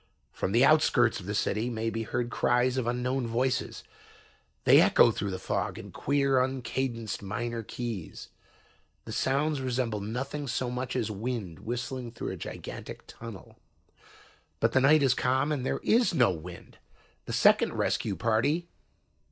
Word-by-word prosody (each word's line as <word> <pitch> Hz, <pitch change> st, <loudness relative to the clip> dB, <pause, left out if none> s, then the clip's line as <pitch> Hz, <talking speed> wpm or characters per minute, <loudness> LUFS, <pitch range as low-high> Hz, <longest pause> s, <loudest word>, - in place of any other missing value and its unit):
"From 95 Hz, -, -3 dB
the 120 Hz, +5 st, +5 dB
outskirts 140 Hz, -6 st, +4 dB
of 90 Hz, -, -10 dB
the 105 Hz, -, -2 dB
city 110 Hz, +4 st, 0 dB
may 115 Hz, -1 st, -2 dB
be 115 Hz, -, -3 dB
heard 120 Hz, +2 st, -2 dB
cries 125 Hz, +1 st, +2 dB
of 130 Hz, -3 st, -1 dB
unknown 125 Hz, +1 st, -1 dB
voices. 125 Hz, +3 st, -1 dB, 0.8 s
They -, -, +7 dB
echo -, -, +6 dB
through 100 Hz, -, -3 dB
the 95 Hz, -, -3 dB
fog 95 Hz, -, -2 dB
in -, -, -9 dB
queer 140 Hz, -2 st, +2 dB
uncadenced 125 Hz, -3 st, -2 dB
minor 115 Hz, +4 st, -3 dB
keys. 115 Hz, -5 st, -6 dB, 0.8 s
The -, -, -7 dB
sounds 140 Hz, +2 st, 0 dB
resemble 125 Hz, -4 st, -1 dB
nothing 135 Hz, +7 st, -4 dB
so 125 Hz, 0 st, -2 dB
much 125 Hz, 0 st, -4 dB
as 115 Hz, -4 st, -1 dB
wind 105 Hz, -5 st, -4 dB
whistling 120 Hz, +1 st, -4 dB
through 115 Hz, -, -4 dB
a -, -, -4 dB
gigantic -, -, -8 dB
tunnel. 115 Hz, -5 st, -11 dB, 1.0 s
But -, -, +2 dB
the 130 Hz, -, +3 dB
night 145 Hz, +2 st, +5 dB
is 130 Hz, -2 st, +4 dB
calm 130 Hz, +4 st, +1 dB
and 145 Hz, -4 st, -1 dB
there -, -, -2 dB
is 230 Hz, -5 st, +3 dB
no 120 Hz, -9 st, +4 dB
wind. 85 Hz, +1 st, -9 dB, 0.5 s
The -, -, -5 dB
second -, -, +4 dB
rescue 100 Hz, -, -1 dB
party... 115 Hz, -, +1 dB
120 Hz, 155 wpm, -28 LUFS, 110-130 Hz, 1.0 s, They